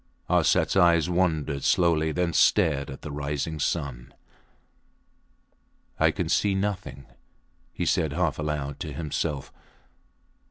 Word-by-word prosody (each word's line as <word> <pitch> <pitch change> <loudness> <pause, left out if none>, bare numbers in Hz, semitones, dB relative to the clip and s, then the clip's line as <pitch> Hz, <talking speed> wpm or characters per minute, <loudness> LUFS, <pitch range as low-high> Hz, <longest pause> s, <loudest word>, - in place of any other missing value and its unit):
Arsats - - +3
eyes 85 -2 +4
wandered 80 -6 0
slowly, 80 -3 +2
then 85 +1 -1
stared 70 -2 +3
at 65 - -9
the 75 - -6
rising 75 +2 -3
sun. 70 -5 -3 1.9
I - - +5
can - - -2
see 100 -2 +1
nothing, 95 -9 -3 0.7
he - - -3
said 80 - +1
half 85 0 -1
aloud 75 -2 -3
to - - -5
himself. 75 -3 -3
80 Hz, 115 wpm, -26 LUFS, 70-85 Hz, 1.9 s, I